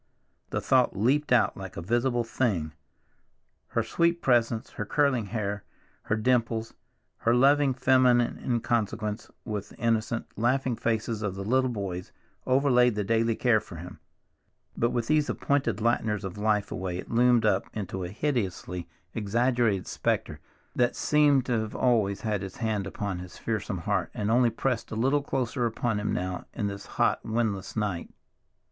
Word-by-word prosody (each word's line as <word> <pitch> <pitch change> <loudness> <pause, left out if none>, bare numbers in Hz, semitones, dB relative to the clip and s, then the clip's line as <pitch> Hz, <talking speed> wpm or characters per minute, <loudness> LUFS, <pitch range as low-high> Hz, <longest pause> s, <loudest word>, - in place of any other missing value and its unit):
The - - -2
thought - - +3
leaped 135 +8 +2
out 120 -2 +4
like 95 -2 -8
a - - -3
visible 120 +4 +1
thing. 100 -10 -1 0.9
Her - - 0
sweet 170 0 +1
presence, 120 -6 +1
her - - -4
curling 130 -2 +1
hair, 100 -1 -3 0.4
her 105 - +1
dimples, 115 -1 0 0.4
her 115 +1 +2
loving 140 +1 +4
feminine 125 -2 +3
inconsequence, 110 -3 -1 0.2
with 105 -2 -4
the - - -15
innocent, 115 0 0
laughing 125 +2 +1
faces 110 -1 -1
of 100 -3 -2
the 100 - -5
little 130 +5 +2
boys, 95 -6 -4 0.4
overlaid 125 -3 +4
the 105 - 0
daily 115 +2 +1
care 120 -3 +3
for 95 - -11
him, 90 +3 -9 0.8
but 120 - +1
with 120 -2 -1
these 155 +1 +2
appointed 140 -5 0
Lighteners 110 -3 +1
of 95 -2 -5
Life 105 -1 0
away 90 -1 -3
it - - -8
loomed 120 -1 +4
up 100 -2 +2
into 95 -3 -4
a 90 - -4
hideously 95 - -2 0.2
exaggerated 115 -1 +1
specter - - -2 0.4
that 120 0 +2
seemed 145 -3 +3
to 120 -3 +1
have 110 -1 -4
always 110 -6 +2
had 105 -4 -1
its 95 -1 -7
hand 110 -4 -1
upon 95 -1 -4
his 90 0 -10
fearsome 110 -4 -3
heart, 95 +2 -1
and 105 0 -1
only 120 0 +4
pressed 125 0 -2
a - - -5
little 135 +6 +2
closer 125 -3 -1
upon 115 -1 -1
him 105 - -2
now 90 0 -3
in 105 - -2
this 100 0 -5
hot - - +2
windless 110 -4 -2
night. 100 -6 -2
115 Hz, 160 wpm, -27 LUFS, 100-125 Hz, 0.9 s, out